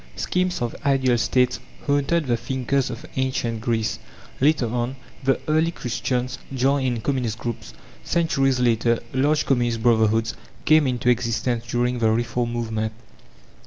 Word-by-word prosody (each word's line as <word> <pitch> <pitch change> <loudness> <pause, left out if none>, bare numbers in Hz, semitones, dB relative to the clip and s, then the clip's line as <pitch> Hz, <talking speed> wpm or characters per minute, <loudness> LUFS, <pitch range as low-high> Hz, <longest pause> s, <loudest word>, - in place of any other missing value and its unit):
Schemes 180 -4 -1
of 120 - -3
ideal 135 -3 +3
States 125 +2 +2 0.3
haunted 145 +3 +1
the 120 -2 +1
thinkers 130 +2 -1
of 125 +4 -7
Ancient 120 -4 -1
Greece; 115 -2 -1 0.4
later 145 -1 +3
on, 120 +3 -2 0.3
the 135 0 +2
early 155 +2 +3
Christians 125 -3 -2
joined 135 +1 +1
in 120 -3 -1
communist 125 -4 -1
groups; 115 - -5 0.3
centuries 135 -6 +1
later, 115 -1 +2 0.2
large 145 +3 +2
communist 120 -4 +1
brotherhoods 110 -1 +3 0.3
came 155 -2 +5
into 125 -1 0
existence 120 0 0
during 120 +1 0
the 110 -1 +3
Reform 120 +1 0
movement. 110 -2 -2
125 Hz, 135 wpm, -23 LUFS, 115-135 Hz, 0.4 s, came